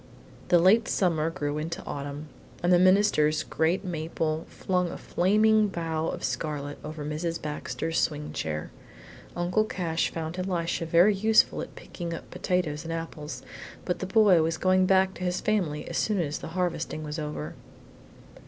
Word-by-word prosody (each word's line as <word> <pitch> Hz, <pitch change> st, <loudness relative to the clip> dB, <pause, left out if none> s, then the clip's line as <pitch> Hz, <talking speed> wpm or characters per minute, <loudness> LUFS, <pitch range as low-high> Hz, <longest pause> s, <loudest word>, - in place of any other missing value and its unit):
The 175 Hz, -, +5 dB
late 195 Hz, +6 st, +5 dB
summer 165 Hz, -4 st, +1 dB
grew 150 Hz, -3 st, -3 dB
into 170 Hz, +4 st, -5 dB
autumn, 145 Hz, +1 st, -5 dB, 0.4 s
and 175 Hz, +1 st, +4 dB
the 175 Hz, -, +6 dB
minister's 185 Hz, -5 st, +4 dB
great 165 Hz, +5 st, 0 dB
maple 160 Hz, -2 st, -2 dB
flung 180 Hz, -2 st, -1 dB
a -, -, -6 dB
flaming 215 Hz, +3 st, +3 dB
bough 165 Hz, -3 st, -2 dB
of -, -, -4 dB
scarlet 145 Hz, +3 st, -3 dB
over 150 Hz, -1 st, -6 dB
Mrs. 165 Hz, +3 st, -2 dB
Baxter's 160 Hz, +2 st, -3 dB
swing 150 Hz, -1 st, -1 dB
chair. 75 Hz, -1 st, -3 dB, 0.6 s
Uncle 175 Hz, +5 st, +1 dB
Cash 170 Hz, -6 st, -1 dB
found 165 Hz, +2 st, -4 dB
Elisha 170 Hz, -3 st, -1 dB
very 175 Hz, +6 st, +5 dB
useful 220 Hz, +3 st, +3 dB
at -, -, -8 dB
picking 170 Hz, -2 st, -6 dB
up -, -, -10 dB
potatoes 165 Hz, -5 st, -1 dB
and 165 Hz, -, -5 dB
apples, 165 Hz, -2 st, -5 dB, 0.4 s
but 180 Hz, -, -1 dB
the 190 Hz, -, -3 dB
boy 195 Hz, -4 st, +5 dB
was 160 Hz, +1 st, 0 dB
going 185 Hz, +1 st, +3 dB
back 190 Hz, 0 st, +4 dB
to 180 Hz, -, -7 dB
his 180 Hz, 0 st, 0 dB
family 180 Hz, -9 st, -1 dB
as -, -, -2 dB
soon 210 Hz, -3 st, +1 dB
as 150 Hz, -3 st, -2 dB
the -, -, -7 dB
harvesting 170 Hz, -3 st, -2 dB
was 150 Hz, +1 st, -4 dB
over. 150 Hz, -, -4 dB
165 Hz, 160 wpm, -27 LUFS, 155-185 Hz, 0.6 s, the